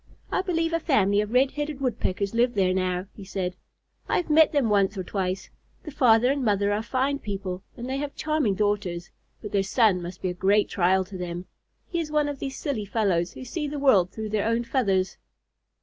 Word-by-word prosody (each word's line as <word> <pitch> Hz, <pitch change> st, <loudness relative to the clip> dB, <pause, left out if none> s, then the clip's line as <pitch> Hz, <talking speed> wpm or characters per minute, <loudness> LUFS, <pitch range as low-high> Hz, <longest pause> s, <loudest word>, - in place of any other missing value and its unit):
"I -, -, +1 dB
believe 330 Hz, -3 st, -1 dB
a 330 Hz, -, +2 dB
family 205 Hz, -, +3 dB
of 210 Hz, 0 st, -4 dB
Red 260 Hz, +2 st, +3 dB
headed 295 Hz, -1 st, -4 dB
Woodpeckers 210 Hz, -6 st, -1 dB
live 240 Hz, +1 st, +2 dB
there 185 Hz, -2 st, +2 dB
now," 185 Hz, 0 st, -1 dB
he 200 Hz, -, -11 dB
said. 185 Hz, -2 st, -3 dB, 0.5 s
"I -, -, +2 dB
have 345 Hz, -, -2 dB
met 315 Hz, 0 st, +6 dB
them 285 Hz, -6 st, +2 dB
once 200 Hz, -1 st, +2 dB
or 185 Hz, -, -2 dB
twice. 185 Hz, 0 st, -3 dB, 0.3 s
The 305 Hz, -, -7 dB
father 245 Hz, -1 st, +4 dB
and 280 Hz, -1 st, -1 dB
mother 205 Hz, -2 st, +2 dB
are 210 Hz, -, 0 dB
fine 265 Hz, +4 st, -1 dB
people, 195 Hz, -4 st, -5 dB, 0.2 s
and 240 Hz, +1 st, -6 dB
they 265 Hz, +1 st, -2 dB
have 285 Hz, 0 st, -4 dB
charming 305 Hz, -10 st, 0 dB
daughters, 200 Hz, -4 st, -1 dB, 0.3 s
but 210 Hz, -, -6 dB
their 200 Hz, -, +2 dB
son 195 Hz, -1 st, +3 dB
must 175 Hz, +1 st, -8 dB
be 185 Hz, -, +1 dB
a -, -, -2 dB
great 200 Hz, +3 st, +2 dB
trial 190 Hz, +1 st, +2 dB
to 190 Hz, 0 st, -9 dB
them. 175 Hz, 0 st, -5 dB, 0.4 s
He 340 Hz, -, -2 dB
is 320 Hz, -2 st, -3 dB
one 300 Hz, -1 st, +1 dB
of 285 Hz, -2 st, -5 dB
these 270 Hz, -1 st, -5 dB
silly 260 Hz, -9 st, -3 dB
fellows 190 Hz, -5 st, 0 dB
who 255 Hz, -, -9 dB
see 300 Hz, +4 st, -3 dB
the 290 Hz, +1 st, -4 dB
world 215 Hz, -11 st, +4 dB
through 220 Hz, -1 st, -5 dB
their 215 Hz, 0 st, 0 dB
own 230 Hz, +1 st, +1 dB
feathers." 195 Hz, -7 st, 0 dB
210 Hz, 215 wpm, -26 LUFS, 190-275 Hz, 0.5 s, met